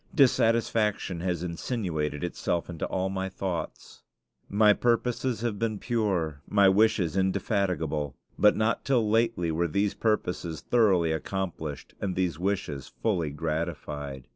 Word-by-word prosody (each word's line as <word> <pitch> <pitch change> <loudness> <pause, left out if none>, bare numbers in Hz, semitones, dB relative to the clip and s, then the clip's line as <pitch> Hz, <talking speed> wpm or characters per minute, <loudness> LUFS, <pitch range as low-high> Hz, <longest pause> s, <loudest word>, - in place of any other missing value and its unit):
Dissatisfaction 115 - +2
has 90 -1 -2
insinuated 85 - -2
itself 85 0 -2
into 85 - -3
all 95 0 -1
my 95 0 -2
thoughts. 95 -3 -5 0.5
My 105 +1 +5
purposes 120 +1 0
have 115 -4 -2
been 110 -2 -1
pure, 95 - -1
my 100 -1 +5
wishes 95 -4 +3
indefatigable; 90 - 0 0.2
but 105 - +5
not 110 +1 0
till 125 -6 +2
lately 115 -6 +1
were 85 +2 +1
these 100 +5 0
purposes 90 -7 -1
thoroughly 95 -9 +3
accomplished 80 -3 -4
and 95 -3 -2
these 90 -4 -1
wishes 90 -8 -2 0.2
fully 90 -9 +1
gratified. 75 -3 -4
95 Hz, 125 wpm, -28 LUFS, 80-110 Hz, 0.5 s, My